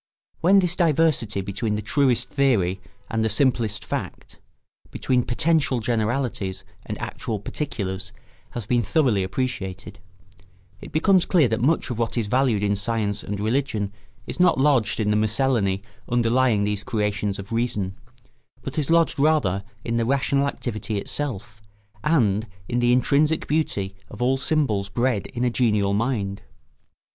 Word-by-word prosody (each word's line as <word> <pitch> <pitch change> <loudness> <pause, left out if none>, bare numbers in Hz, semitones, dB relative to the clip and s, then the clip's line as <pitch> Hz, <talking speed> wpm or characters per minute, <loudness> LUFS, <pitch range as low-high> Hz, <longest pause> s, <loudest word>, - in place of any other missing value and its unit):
] - - -43
When 190 +4 +5
this 180 -3 +3
diversity 155 - +2
between 100 +3 -2
the 105 - -2
truest 130 +2 +2
theory 100 -10 +1 0.3
and 115 -1 0
the 110 - +1
simplest 115 -3 +1
fact, - - -6 0.5
between 125 -1 +1
potential 140 +1 +1
generalities 110 -3 -1 0.2
and - - -5
actual 110 -3 -4
particulars, 95 -5 -4 0.5
has 115 - -4
been 120 +2 +2
thoroughly 120 - +2
appreciated, 95 -2 -4 0.8
it - - -10
becomes 185 +3 +3
clear 165 -8 +4
that 110 0 -1
much 145 +1 +1
of 120 - -4
what 115 +1 -1
is 115 - +1
valued 120 -2 +1
in 100 0 +2
science 105 0 -1
and 100 0 -5
religion 110 -3 -1 0.3
is - - -6
not 180 0 +5
lodged 130 -7 +2
in 105 -1 +1
the - - +2
miscellany 110 -3 +1 0.3
underlying 120 -2 +2
these 105 0 -1
creations 105 -2 -1
of 100 +1 -9
reason, 115 -5 -1 0.7
but - - -3
is 150 - -2
lodged 165 -2 +3
rather 140 -11 +2 0.2
in 115 0 0
the 115 - +1
rational 140 +2 +1
activity 110 -5 -3
itself, 110 -2 -5 0.4
and 115 -9 +2 0.2
in 120 - 0
the 120 0 +3
intrinsic 145 +5 +2
beauty 105 -11 -1 0.2
of 105 - -11
all 125 +2 +2
symbols 135 -9 0
bred 120 0 0
in 120 - -4
a 125 - +2
genial 105 -5 +2
mind. 105 -3 -1
115 Hz, 150 wpm, -24 LUFS, 105-135 Hz, 0.8 s, When